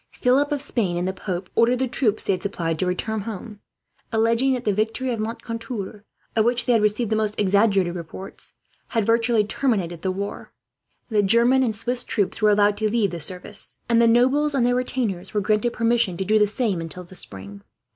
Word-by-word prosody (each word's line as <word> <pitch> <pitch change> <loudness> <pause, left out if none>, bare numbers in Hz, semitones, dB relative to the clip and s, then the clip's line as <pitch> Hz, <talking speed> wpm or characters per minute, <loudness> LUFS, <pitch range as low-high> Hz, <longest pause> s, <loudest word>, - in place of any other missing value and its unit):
Philip 275 +4 +2
of 290 -1 -1
Spain 195 -11 -1
and 175 +1 -1
the 190 - -1
pope 185 -1 -5
ordered 240 +2 +3
the 260 +1 0
troops 225 -3 0
they - - +1
had 185 - -3
supplied 165 -5 -2
to 185 - 0
return 215 +4 -2
home, 210 0 -7 0.5
alleging 230 +4 +2
that 250 -1 -3
the 210 - +1
victory 225 +5 -1
of 230 - -3
Moncontour, 230 -2 -5 0.3
of 220 - +4
which 240 +1 +1
they 245 - +3
had 225 - +3
received 210 +2 0
the - - +3
most 215 -1 -1
exaggerated 200 -2 +3
reports, 175 +2 -7 0.3
had 225 -3 0
virtually 230 0 +3
terminated 200 - -1
the 190 - -1
war. 200 +2 -5 0.6
The 215 -3 +3
German 235 +6 +4
and 230 -4 0
Swiss 245 +3 -2
troops 205 +1 -1
were 215 - +5
allowed 205 0 +3
to 215 -1 0
leave 210 -4 +1
the 170 - -5
service, 185 +5 0
and 235 -1 +4
the 230 - +5
nobles 265 +6 +3
and 250 -3 +2
their 245 - +2
retainers 230 -7 -2
were 210 - +2
granted 215 +3 +1
permission 230 -5 +1
to 190 - -2
do 215 +2 +3
the 210 - +4
same, 210 -4 -1
until 165 +2 -6
the 180 +2 -15
spring. 100 - -5
215 Hz, 205 wpm, -23 LUFS, 190-235 Hz, 0.6 s, were